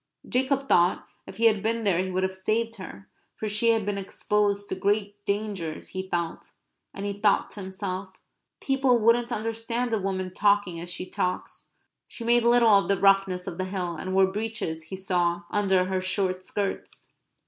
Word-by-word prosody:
Jacob 270 +2 0
thought 175 -4 +3 0.2
that - - -8
if - - -15
he 230 - +2
had 215 -3 +4
been 230 +2 -1
there 190 -5 +2
he 185 - -3
would 185 0 -1
have 190 0 0
saved 225 +4 -1
her; 195 +1 -10 0.3
for 215 - -4
she 215 +3 +1
had 225 -3 +2
been 205 -1 -1
exposed 205 +1 0
to - - -3
great 205 +1 -1
dangers, 200 -6 -3
he 190 0 -5
felt, 170 -2 -3 0.4
and, 195 - -6
he 200 - -1
thought 205 0 +2
to 205 - -8
himself, 190 0 -4 0.5
"People 270 -2 +2
wouldn't 235 +2 +3
understand 230 +2 -2
a 220 - +2
woman 190 -1 -3
talking 200 -4 +2
as 175 +1 -6
she 180 +1 -3
talks." 180 0 -4 0.3
She 235 - -8
made 240 0 +3
little 235 -1 +5
of 200 0 +4
the 200 - +2
roughness 195 -1 +3
of 185 -2 -6
the 185 - 0
hill; 185 -3 -3
and 185 +4 -4
wore 190 0 +6
breeches, 205 -7 -4
he 175 - -6
saw, 175 -2 0
under 190 -3 +2
her 185 0 -1
short 185 0 -1
skirts. 200 0 -4
200 Hz, 190 wpm, -26 LUFS, 185-220 Hz, 0.5 s, wore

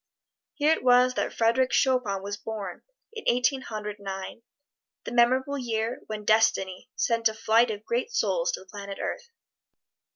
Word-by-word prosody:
Here 305 +1 +3
it - - -4
was 250 0 +5
that - - -1
Frederic 235 +3 +2
Chopin 245 -8 +1
was 200 0 -4
born, 215 -1 -6 0.3
in 445 - -7
Eighteen 250 +2 +2
Hundred 210 -3 -6
Nine 195 +2 -6 0.6
that - - -6
memorable 260 +4 +3
year 230 0 -2
when 215 -1 -6
Destiny 215 -1 +2
sent 230 -1 +2
a 220 - -7
flight 225 +2 +3
of 210 0 -5
great 245 - -1
souls - - +1
to - - -4
the - - -15
planet 200 0 -8
Earth. 480 -1 -4
230 Hz, 160 wpm, -27 LUFS, 210-255 Hz, 0.6 s, was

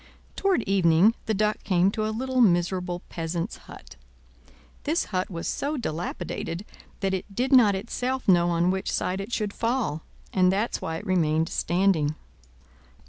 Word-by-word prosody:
Toward 385 - +1
evening 190 +1 +4
the 220 - +1
Duck 210 +1 0
came 185 0 +3
to 215 0 -1
a - - -1
little 255 +3 0
miserable 180 -2 +1
peasant's 170 +4 -3
hut. - - -12 0.8
This 315 +4 0
hut 185 0 0
was 170 -3 -5
so 295 +2 -2
dilapidated 175 - -4 0.4
that 195 -1 0
it 190 +1 -5
did 255 +5 0
not 220 -6 +6
itself 250 +5 -3
know 175 -2 +5
on 170 +1 +2
which 190 0 -2
side 185 +2 -1
it 200 +4 -7
should 210 -3 -1
fall; 230 - -1 0.3
and 185 -1 +4
that's 205 +5 -1
why 160 0 -3
it 210 - -9
remained 160 -4 +1
standing. 170 -4 +1
190 Hz, 155 wpm, -26 LUFS, 175-220 Hz, 0.8 s, not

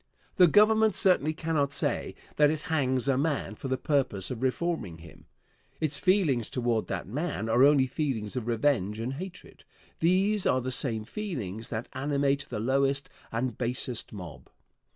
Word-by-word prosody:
The 180 - +7
Government 215 +3 +4
certainly 180 -5 +4
cannot 155 -4 -1
say 140 - 0 0.2
that 150 -1 +5
it 155 0 -3
hangs 130 -3 +1
a 135 -1 +2
man 145 -6 -1
for 120 - -7
the 130 0 -1
purpose 130 -9 0
of 125 -2 -5
reforming 130 - -2
him. 85 +1 -15 0.5
Its 150 -3 +1
feelings 175 - +2
toward 120 -3 -1
that 95 - -4
man 140 - -3
are 120 +3 +4
only 140 -2 +5
feelings 130 -6 -3
of 120 -3 -3
revenge 115 -4 +1
and 120 +4 -3
hatred. 180 +6 -9 0.4
These 190 +4 +2
are 130 - +3
the 130 +1 -3
same 115 -4 0
feelings 115 - -5
that 110 +2 -4
animate 140 0 0
the - - -4
lowest 135 +3 0 0.2
and 120 0 -2
basest 125 -1 -2
mob. 90 -9 -10
135 Hz, 160 wpm, -28 LUFS, 115-155 Hz, 0.5 s, The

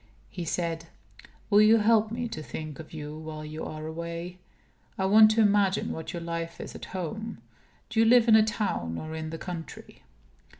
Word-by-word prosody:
He 175 -2 -5
said: 165 -1 -2 0.6
"Will 205 +1 +7
you 215 +2 +7
help 220 0 +3
me 240 +2 -3
to 155 - -6
think 155 -1 -7
of 160 - -10
you 150 -1 -7
while 155 -1 -7
you 155 +1 -6
are 155 0 -6
away? 170 +2 -6 0.6
I 190 - 0
want 215 +2 +7
to 220 +1 +3
imagine 205 -2 +3
what 160 - -5
your 170 -1 -5
life 165 0 -4
is - - -7
at - - -8
home. 215 +5 -5 0.5
Do 225 0 -1
you 225 - +6
live 240 0 +6
in 220 - +7
a 220 - +8
town 210 - -1
or 155 0 -6
in 160 0 -4
the 165 - -5
country?" 170 -1 -8
170 Hz, 195 wpm, -28 LUFS, 160-215 Hz, 0.6 s, a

